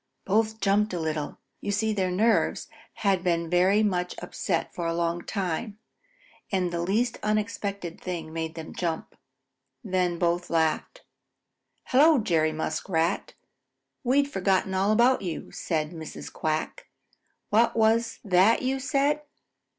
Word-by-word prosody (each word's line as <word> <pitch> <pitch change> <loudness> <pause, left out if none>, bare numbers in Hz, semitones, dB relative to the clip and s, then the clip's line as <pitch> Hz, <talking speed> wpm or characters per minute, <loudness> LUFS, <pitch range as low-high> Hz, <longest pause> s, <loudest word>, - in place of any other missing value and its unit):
Both 220 +2 +1
jumped 200 0 +2
a - - -2
little. 155 -2 -3 0.2
You 205 - -3
see 215 +2 +1
their 190 -3 0
nerves 220 +5 +1 0.4
had 190 -3 +3
been 170 -2 0
very 190 +4 +4
much 180 -3 0
upset 170 -4 -2
for 170 -1 -3
a 165 - -1
long 170 0 0
time, 200 +3 -3 0.7
and 185 -3 0
the 170 0 -2
least 220 +7 0
unexpected 205 -4 -2
thing 165 -3 -5
made 160 0 -4
them 160 -1 -7
jump. 165 -3 -3 0.7
Then 180 -2 0
both 175 0 0
laughed. 165 - 0 0.8
"Hello, 295 +4 +5
Jerry 165 -8 +2
Muskrat! 160 +3 -1 0.7
We'd 275 +3 +3
forgotten 190 -5 +1
all 195 +2 +2
about 240 +4 +4
you," 175 -4 -5
said 155 -2 -2
Mrs. 160 -3 -8
Quack. 160 - -2 0.6
"What 225 +3 +4
was 225 +1 +2
that 195 +4 +4
you 265 +1 0
said?" 285 +2 +1
190 Hz, 135 wpm, -27 LUFS, 170-220 Hz, 0.8 s, Hello